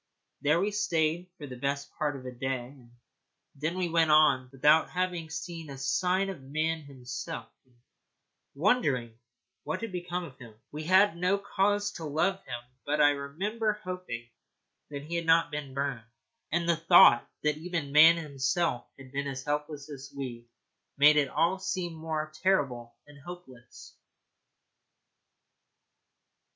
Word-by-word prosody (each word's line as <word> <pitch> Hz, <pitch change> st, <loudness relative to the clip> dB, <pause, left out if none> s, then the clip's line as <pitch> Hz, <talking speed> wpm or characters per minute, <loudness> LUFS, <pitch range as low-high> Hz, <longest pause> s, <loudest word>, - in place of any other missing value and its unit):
There 150 Hz, +3 st, +3 dB
we 200 Hz, +3 st, 0 dB
stayed 175 Hz, -4 st, 0 dB
for 150 Hz, -, -8 dB
the 130 Hz, -3 st, -8 dB
best 140 Hz, +2 st, -3 dB
part 150 Hz, -2 st, 0 dB
of 130 Hz, -1 st, -9 dB
a 125 Hz, -, -5 dB
day, 125 Hz, 0 st, -3 dB
and 130 Hz, -4 st, -17 dB, 0.6 s
then 155 Hz, +6 st, -3 dB
we 185 Hz, -1 st, 0 dB
went 165 Hz, -1 st, +2 dB
on 150 Hz, -4 st, +5 dB
without 150 Hz, +4 st, +4 dB
having 180 Hz, -3 st, -2 dB
seen 165 Hz, -1 st, -6 dB
a 135 Hz, -, -7 dB
sign 180 Hz, +8 st, +1 dB
of 180 Hz, -, -10 dB
man 155 Hz, +4 st, -1 dB
himself, 135 Hz, -4 st, -7 dB
and 125 Hz, -1 st, -31 dB, 0.8 s
wondering 140 Hz, -, +1 dB, 0.4 s
what 155 Hz, -, -4 dB
had 230 Hz, -2 st, -4 dB
become 180 Hz, 0 st, -3 dB
of 135 Hz, -7 st, -11 dB
him. 115 Hz, -4 st, -12 dB, 0.2 s
We 155 Hz, +1 st, -6 dB
had 190 Hz, +2 st, +5 dB
no 180 Hz, +3 st, +1 dB
cause 205 Hz, +1 st, 0 dB
to 165 Hz, -, -8 dB
love 185 Hz, +6 st, 0 dB
him; 120 Hz, -1 st, -5 dB, 0.2 s
but 150 Hz, +1 st, -1 dB
I 145 Hz, 0 st, +6 dB
remember 195 Hz, +11 st, -2 dB
hoping 180 Hz, -, -6 dB, 0.6 s
that 140 Hz, -1 st, -6 dB
he 160 Hz, +3 st, -8 dB
had 170 Hz, -1 st, -4 dB
not 165 Hz, 0 st, +4 dB
been 145 Hz, -3 st, -5 dB
burned. 135 Hz, -5 st, -3 dB, 0.4 s
And 170 Hz, +1 st, 0 dB
the 170 Hz, -1 st, +3 dB
thought 165 Hz, -7 st, +7 dB
that 150 Hz, 0 st, +1 dB
even 165 Hz, -3 st, -4 dB
man 160 Hz, +3 st, +8 dB
himself 145 Hz, -2 st, -1 dB
had 135 Hz, -2 st, -13 dB
been 140 Hz, +1 st, -2 dB
as 130 Hz, -1 st, -5 dB
helpless 150 Hz, 0 st, -3 dB
as 135 Hz, -1 st, -9 dB
we 120 Hz, -3 st, -6 dB, 0.5 s
made 150 Hz, +2 st, +7 dB
it 145 Hz, -3 st, +2 dB
all 170 Hz, +7 st, +1 dB
seem 185 Hz, -3 st, -3 dB
more 155 Hz, -1 st, -4 dB
terrible 125 Hz, -11 st, 0 dB
and 145 Hz, -1 st, -16 dB
hopeless. 140 Hz, -8 st, -12 dB
155 Hz, 155 wpm, -29 LUFS, 135-175 Hz, 0.8 s, man